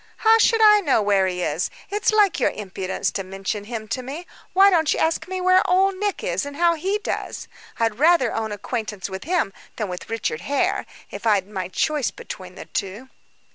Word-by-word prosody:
"How 450 Hz, 0 st, +5 dB
should 450 Hz, 0 st, +4 dB
I 420 Hz, -1 st, +8 dB
know 285 Hz, -, +2 dB
where 200 Hz, -2 st, +3 dB
he 180 Hz, -1 st, -2 dB
is? -, -, -1 dB, 0.2 s
It's 415 Hz, +2 st, +1 dB
like 415 Hz, -6 st, +3 dB
your -, -, +3 dB
impudence 190 Hz, -2 st, -3 dB
to 195 Hz, -, -3 dB
mention 195 Hz, +2 st, -4 dB
him 220 Hz, -1 st, -6 dB
to 255 Hz, -, -2 dB
me. 285 Hz, +8 st, -7 dB, 0.3 s
Why 390 Hz, +1 st, +6 dB
don't 320 Hz, -4 st, +3 dB
you -, -, 0 dB
ask 325 Hz, +2 st, 0 dB
me 375 Hz, 0 st, -3 dB
where 370 Hz, 0 st, +5 dB
Old 380 Hz, +2 st, +3 dB
Nick 410 Hz, 0 st, -2 dB
is, -, -, -1 dB
and 285 Hz, 0 st, -7 dB
how 340 Hz, +2 st, +3 dB
he 380 Hz, +6 st, -1 dB
does? 425 Hz, -, -5 dB, 0.3 s
I'd 225 Hz, 0 st, 0 dB
rather 310 Hz, -6 st, +4 dB
own 220 Hz, -1 st, -2 dB
acquaintance 210 Hz, -2 st, -4 dB
with 190 Hz, +4 st, -6 dB
him 335 Hz, -, 0 dB, 0.2 s
than 210 Hz, -4 st, -3 dB
with 180 Hz, 0 st, -7 dB
Richard 215 Hz, -8 st, -2 dB
Hare, 360 Hz, -, 0 dB, 0.2 s
if -, -, -5 dB
I'd 200 Hz, -3 st, +3 dB
my 190 Hz, -3 st, -4 dB
choice 295 Hz, -, 0 dB
between 185 Hz, -2 st, -9 dB
the -, -, -9 dB
two." 205 Hz, +7 st, -5 dB
260 Hz, 205 wpm, -23 LUFS, -, 0.3 s, I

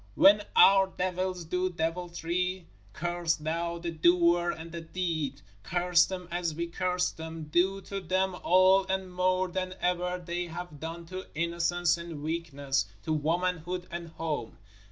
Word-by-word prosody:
When 205 Hz, +2 st, +7 dB
our 195 Hz, 0 st, +7 dB
devils 185 Hz, -1 st, -2 dB
do 180 Hz, +3 st, 0 dB
deviltry, 175 Hz, +1 st, -2 dB, 0.3 s
curse 175 Hz, +3 st, -1 dB
Thou 170 Hz, +2 st, -2 dB
the 170 Hz, 0 st, -4 dB
doer 170 Hz, +1 st, +4 dB
and 165 Hz, -1 st, -5 dB
the 170 Hz, 0 st, -5 dB
deed: 160 Hz, -5 st, -3 dB, 0.2 s
curse 175 Hz, -, +3 dB
them 180 Hz, -2 st, -6 dB
as 170 Hz, -2 st, -1 dB
we 170 Hz, +2 st, -2 dB
curse 180 Hz, +1 st, 0 dB
them, 160 Hz, 0 st, -7 dB
do 180 Hz, +6 st, +1 dB
to 195 Hz, 0 st, -5 dB
them 185 Hz, +1 st, 0 dB
all 185 Hz, +2 st, +5 dB
and 190 Hz, -1 st, -2 dB
more 185 Hz, +1 st, +2 dB
than 185 Hz, +1 st, -3 dB
ever 180 Hz, 0 st, 0 dB
they 175 Hz, 0 st, -4 dB
have 170 Hz, -2 st, -7 dB
done 165 Hz, +2 st, -6 dB
to 185 Hz, +2 st, -7 dB
innocence 170 Hz, +1 st, +1 dB
and 165 Hz, -4 st, -7 dB
weakness, 145 Hz, -, -1 dB, 0.2 s
to 155 Hz, -, -1 dB
womanhood 175 Hz, +3 st, -1 dB
and 170 Hz, 0 st, -5 dB
home. 160 Hz, -7 st, -4 dB
175 Hz, 150 wpm, -29 LUFS, 165-180 Hz, 0.3 s, When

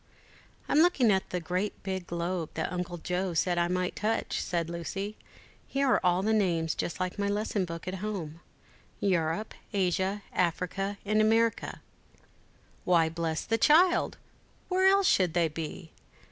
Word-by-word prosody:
"I'm 295 Hz, -, +3 dB
looking 305 Hz, -9 st, +4 dB
at 190 Hz, -1 st, 0 dB
the 180 Hz, -, -2 dB
great 180 Hz, +4 st, -3 dB
big 190 Hz, -2 st, -4 dB
globe, 170 Hz, -1 st, -2 dB
that 160 Hz, -, -2 dB
Uncle 180 Hz, -1 st, -3 dB
Joe 180 Hz, +1 st, -2 dB
said 175 Hz, +1 st, +1 dB
I 170 Hz, -, +2 dB
might 180 Hz, 0 st, -1 dB
touch," 220 Hz, +2 st, -1 dB
said 170 Hz, -2 st, -1 dB
Lucy: 195 Hz, +5 st, -4 dB, 0.5 s
"here 275 Hz, 0 st, 0 dB
are -, -, +3 dB
all 180 Hz, +1 st, +3 dB
the 220 Hz, +2 st, +2 dB
names 170 Hz, -6 st, +1 dB
just 170 Hz, -, -4 dB
like 185 Hz, +2 st, -3 dB
my 200 Hz, -, +1 dB
lesson 205 Hz, -1 st, 0 dB
book 165 Hz, 0 st, -7 dB
at 185 Hz, -, -2 dB
home; 175 Hz, -7 st, -4 dB, 0.6 s
Europe, 175 Hz, +1 st, 0 dB, 0.2 s
Asia, 190 Hz, +1 st, 0 dB
Africa, 185 Hz, +3 st, -1 dB
and 215 Hz, +1 st, +3 dB
America." 225 Hz, +1 st, +1 dB, 1.0 s
"Why, 170 Hz, -3 st, +3 dB
bless 165 Hz, -1 st, -2 dB
the 225 Hz, 0 st, 0 dB
child! 345 Hz, +8 st, +4 dB, 0.5 s
where 375 Hz, +1 st, +3 dB
else 395 Hz, 0 st, +5 dB
should 180 Hz, -, +3 dB
they 170 Hz, -2 st, +3 dB
be? 160 Hz, +1 st, -7 dB
185 Hz, 155 wpm, -29 LUFS, 170-210 Hz, 1.0 s, else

